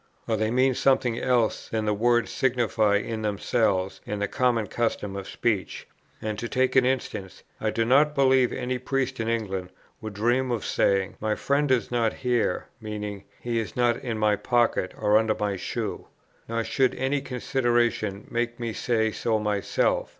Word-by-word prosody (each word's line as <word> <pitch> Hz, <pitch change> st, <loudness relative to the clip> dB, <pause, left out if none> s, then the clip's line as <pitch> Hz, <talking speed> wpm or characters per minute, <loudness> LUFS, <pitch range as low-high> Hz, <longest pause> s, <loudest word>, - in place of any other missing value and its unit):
Or 115 Hz, -, +1 dB
they 110 Hz, 0 st, 0 dB
mean 130 Hz, +3 st, +3 dB
something 125 Hz, -2 st, +2 dB
else 120 Hz, -4 st, +1 dB
than 110 Hz, -1 st, -1 dB
the 105 Hz, -, +2 dB
words 120 Hz, +2 st, +2 dB
signify 115 Hz, -5 st, +2 dB
in 110 Hz, +2 st, -2 dB
themselves 100 Hz, -2 st, 0 dB
and 105 Hz, 0 st, -3 dB
the 105 Hz, -, 0 dB
common 120 Hz, -1 st, +1 dB
custom 105 Hz, -3 st, -2 dB
of 100 Hz, -1 st, -6 dB
speech." 100 Hz, -8 st, -2 dB, 0.4 s
And, 110 Hz, -1 st, -3 dB
to 120 Hz, -, -4 dB
take 130 Hz, -1 st, +1 dB
an 130 Hz, -1 st, +5 dB
instance: 100 Hz, -7 st, -3 dB, 0.2 s
I 110 Hz, -, 0 dB
do 115 Hz, +1 st, 0 dB
not 145 Hz, +5 st, +4 dB
believe 130 Hz, -2 st, +4 dB
any 125 Hz, 0 st, -2 dB
priest 130 Hz, 0 st, -2 dB
in 110 Hz, -, -2 dB
England 95 Hz, -6 st, -2 dB, 0.3 s
would 110 Hz, -2 st, -6 dB
dream 120 Hz, +5 st, +1 dB
of 120 Hz, -3 st, -2 dB
saying, 100 Hz, -1 st, +1 dB
"My 110 Hz, 0 st, 0 dB
friend 145 Hz, +1 st, +1 dB
is 130 Hz, -2 st, +1 dB
not 115 Hz, -2 st, +1 dB
here;" 120 Hz, -7 st, 0 dB, 0.2 s
meaning, 105 Hz, -2 st, -5 dB, 0.2 s
"He 120 Hz, -1 st, -1 dB
is 110 Hz, -, -5 dB
not 120 Hz, -1 st, +3 dB
in 120 Hz, -4 st, -4 dB
my 105 Hz, -1 st, +2 dB
pocket 120 Hz, -6 st, +1 dB
or 105 Hz, +1 st, +4 dB
under 110 Hz, -1 st, +1 dB
my 105 Hz, -1 st, -1 dB
shoe." 95 Hz, -, -4 dB, 0.4 s
Nor 115 Hz, 0 st, -1 dB
should 130 Hz, +2 st, +1 dB
any 135 Hz, +2 st, 0 dB
consideration 120 Hz, -6 st, 0 dB
make 120 Hz, 0 st, -2 dB
me 115 Hz, -2 st, -3 dB
say 110 Hz, -1 st, 0 dB
so 110 Hz, +1 st, 0 dB
myself. 105 Hz, -2 st, 0 dB
115 Hz, 175 wpm, -26 LUFS, 105-125 Hz, 0.4 s, an